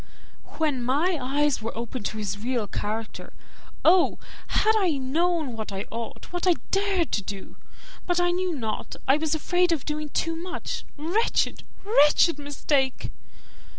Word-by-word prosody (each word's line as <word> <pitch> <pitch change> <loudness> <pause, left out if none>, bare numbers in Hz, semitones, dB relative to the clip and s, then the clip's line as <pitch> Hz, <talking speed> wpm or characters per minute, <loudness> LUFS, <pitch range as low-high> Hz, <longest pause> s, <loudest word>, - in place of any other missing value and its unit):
"When 295 -5 +1
my 305 +7 +1
eyes 280 0 +1
were 225 +1 -5
opened 235 -1 -3
to 220 - -6
his 200 -2 -3
real 240 0 -1
character, 215 +2 -4 0.5
oh! 350 +2 +5 0.3
had 440 +1 +3
I 365 -9 +2
known 305 0 0
what 220 -2 -5
I 195 +1 -4
ought, 230 +8 -7
what 355 +1 -1
I 355 - +6 0.2
dared 390 -4 +1
to 205 - +1
do! 195 0 -7 0.5
But 355 -1 +2
I 350 0 +3
knew 365 +1 0
not 220 -6 -4
I 270 +2 +5
was 315 0 0
afraid 355 +3 +2
of 320 -5 0
doing 300 0 -3
too 330 +3 -1
much. 355 +2 -5
Wretched, 350 +10 +1 0.2
wretched 310 -4 +5
mistake!" 285 -2 0
295 Hz, 150 wpm, -26 LUFS, 240-350 Hz, 0.5 s, I